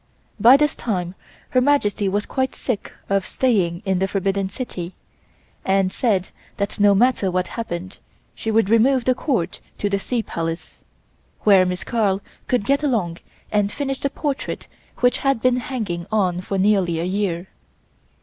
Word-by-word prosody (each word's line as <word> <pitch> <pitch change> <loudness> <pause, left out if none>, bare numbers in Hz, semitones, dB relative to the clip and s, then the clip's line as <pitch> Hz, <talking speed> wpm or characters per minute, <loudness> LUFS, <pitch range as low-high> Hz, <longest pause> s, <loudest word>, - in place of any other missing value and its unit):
By 240 +6 +8
this 295 0 +1
time 180 -6 -2 0.4
Her 255 - +3
Majesty 215 -7 +2
was 205 +2 -1
quite 260 0 -1
sick 240 -6 -3 0.2
of 195 -1 +1
staying 190 -10 0
in 190 -2 +1
the 190 - +1
Forbidden 195 0 -1
City 185 -5 -6 0.7
and 190 -1 +2
said 195 -6 0 0.3
that 200 +1 -2
no 205 -1 +6
matter 240 -2 +3
what 180 0 0
happened 185 -4 -5 0.3
she 225 - -5
would 220 -2 +3
remove 235 +4 +4
the 255 - +4
Court 230 - -1 0.2
to 205 - -1
the 200 - +1
Sea 235 +3 -2
Palace, 165 -2 -5 0.6
where 195 -3 +6
Miss 180 0 -3
Carl 205 -5 +1 0.3
could 245 -5 +1
get 280 +4 +2
along 210 - 0 0.3
and 205 -1 +2
finish 270 +1 -3
the 280 - 0
portrait 285 -1 -3 0.4
which 245 0 +3
had 275 -3 +1
been 250 +1 +3
hanging 215 -10 -3
on 185 -5 +1
for 195 +1 -3
nearly 190 -4 +2
a - - -1
year. 185 -1 -1
205 Hz, 160 wpm, -22 LUFS, 185-245 Hz, 0.7 s, By